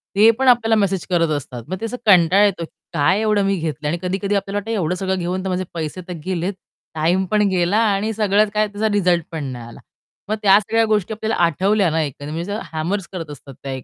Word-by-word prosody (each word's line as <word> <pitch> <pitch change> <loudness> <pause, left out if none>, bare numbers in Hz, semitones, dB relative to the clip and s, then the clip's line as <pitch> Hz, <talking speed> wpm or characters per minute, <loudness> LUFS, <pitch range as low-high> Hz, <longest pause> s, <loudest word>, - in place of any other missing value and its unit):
ते 210 +3 +7
पण 265 - +1
आपल्याला 230 -3 +4
मेसेज 195 -3 0
करत 170 -2 +2
असतात. 125 -4 -8
मग 185 - -4
ते 225 - -2
असं 250 +2 -4
कंटाळा 190 0 +5
येतो 190 -4 0
की - - -22 0.2
काय 170 +6 +2
एवढं 210 -2 +2
मी 195 0 +1
घेतलंय 155 -2 -3
आणि 170 - -1
कधी-कधी 195 +2 -1
आपल्याला 200 +1 -2
वाटतं, 210 +3 -4
एवढं 180 -5 0
सगळं 190 0 -1
घेऊन 180 +2 -2
तर 190 - -3
माझे 185 0 -1
पैसे 165 +2 -4
तर 180 - -5
गेलेत, 185 +1 -2 0.4
टाईम 175 +5 +1
पण 210 -1 +3
गेला 185 +2 +1
आणि 205 +2 0
सगळ्यात 210 0 +2
काय, 215 0 +2
त्याचा 210 +1 -2
रिझल्ट 180 -4 +2
पण 160 -3 -4
नाही 125 -3 -6
आला. 120 - -12 0.5
मग 215 - +1
त्या 200 -1 +6
सगळ्या 225 +2 +1
गोष्टी 215 -1 0
आपल्याला 220 +1 -2
आठवल्या 190 +4 +2
ना 160 - +1
एखादी 145 0 -5
वेळेस, 170 +4 -4
म्हणजे 210 +2 -4
हॅमर्स 170 +4 -2
करत 165 -5 -6
असतात 140 -1 -11
त्या 135 - -4
एक 130 -1 -6
190 Hz, 235 wpm, -20 LUFS, 165-205 Hz, 0.5 s, ते